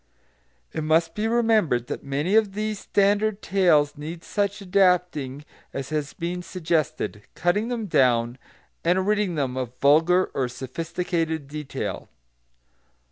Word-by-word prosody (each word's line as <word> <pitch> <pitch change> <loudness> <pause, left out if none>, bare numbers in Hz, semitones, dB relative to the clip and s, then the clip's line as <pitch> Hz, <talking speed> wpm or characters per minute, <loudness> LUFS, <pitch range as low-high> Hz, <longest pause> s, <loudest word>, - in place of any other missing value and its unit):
It 155 - -2
must 165 +1 +2
be 215 +1 -1
remembered 220 - +2
that - - -5
many 145 +7 -1
of 215 -3 +3
these 215 0 -2
standard 205 +1 +1
tales 160 -7 +3
need 165 +3 -7
such 205 0 -1
adapting 180 -8 +1 0.3
as 135 -1 -4
has 150 -2 -2
been 175 +1 -3
suggested, 160 - -2
cutting 190 +6 +1
them 240 -3 -2
down, 125 - +2 0.4
and 180 +2 +2
ridding 210 -4 +1
them 135 -4 -1
of 125 -1 -4
vulgar 165 +6 +4
or 130 -2 0
sophisticated 160 +4 -3
detail. 150 0 -5
170 Hz, 130 wpm, -24 LUFS, 145-195 Hz, 0.4 s, vulgar